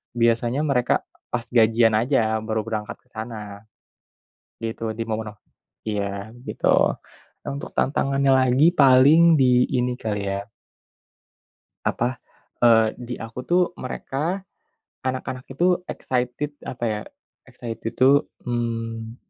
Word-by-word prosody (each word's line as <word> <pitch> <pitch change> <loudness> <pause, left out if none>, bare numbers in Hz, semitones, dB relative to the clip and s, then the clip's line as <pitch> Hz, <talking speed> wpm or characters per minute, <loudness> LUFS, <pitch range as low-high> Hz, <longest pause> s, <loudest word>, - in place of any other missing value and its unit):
biasanya 120 +3 +2
mereka 125 -3 +2 0.4
pas 120 -2 0
gajian 115 -1 +4
aja 110 -2 +1
baru 110 0 -1
berangkat 105 -2 -4
ke - - -33
sana, 110 -2 -7 1.0
gitu. 115 0 -3
di 115 - -1
momen-mo 110 -1 -3 0.5
iya, 100 0 -3 0.2
gitu. - - -1 0.8
Untuk 140 +1 -5
tantangannya 135 0 +1
lagi 130 +5 +4
paling 145 +5 +6
di 125 -2 +4
ini 125 0 +1
kali 105 -4 -3
ya 100 +1 -3 1.4
Apa 125 +1 0 0.5
e - - +8 0.3
di 125 0 -6
aku 115 +2 -7
tuh 180 +1 +3
mereka, 155 +8 -3 0.7
anak-anak 130 0 -3
itu 175 +6 +2
excited, 125 +4 -2
apa 120 -1 -4
ya? 105 -2 -1 0.5
Excited 115 -1 -6
itu 140 +2 +5 0.2
mmm 115 -1 -3
120 Hz, 110 wpm, -23 LUFS, 110-130 Hz, 1.4 s, e